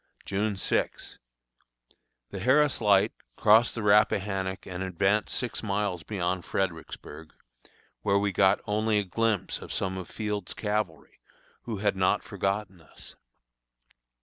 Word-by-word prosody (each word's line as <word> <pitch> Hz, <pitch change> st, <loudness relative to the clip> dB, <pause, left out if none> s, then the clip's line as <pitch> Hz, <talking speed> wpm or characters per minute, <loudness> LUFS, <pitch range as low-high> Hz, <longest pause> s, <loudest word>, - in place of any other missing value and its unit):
June 100 Hz, +1 st, -1 dB
6. -, -, -2 dB, 1.1 s
The 100 Hz, -, -5 dB
Harris 135 Hz, +5 st, +3 dB
Light 100 Hz, -2 st, +4 dB, 0.2 s
crossed 110 Hz, +2 st, +5 dB
the 115 Hz, -, -3 dB
Rappahannock 100 Hz, -2 st, +2 dB
and 90 Hz, 0 st, -6 dB
advanced 95 Hz, +3 st, +1 dB
six 125 Hz, -3 st, -2 dB
miles 100 Hz, -4 st, -1 dB
beyond 90 Hz, -2 st, -2 dB
Fredericksburg, 80 Hz, -3 st, -4 dB, 0.7 s
where 100 Hz, -1 st, +2 dB
we 100 Hz, 0 st, +1 dB
got 95 Hz, +1 st, +3 dB
only 105 Hz, +1 st, +1 dB
a 105 Hz, -, +2 dB
glimpse 110 Hz, +1 st, -1 dB
of -, -, -9 dB
some 95 Hz, 0 st, -1 dB
of 90 Hz, -, -8 dB
Field's 105 Hz, -3 st, -4 dB
cavalry, 105 Hz, -6 st, -3 dB, 0.5 s
who 115 Hz, -3 st, -3 dB
had 100 Hz, 0 st, +1 dB
not 95 Hz, -1 st, +2 dB
forgotten 95 Hz, -2 st, -3 dB
us. 80 Hz, -, -15 dB
100 Hz, 125 wpm, -28 LUFS, 95-105 Hz, 1.1 s, crossed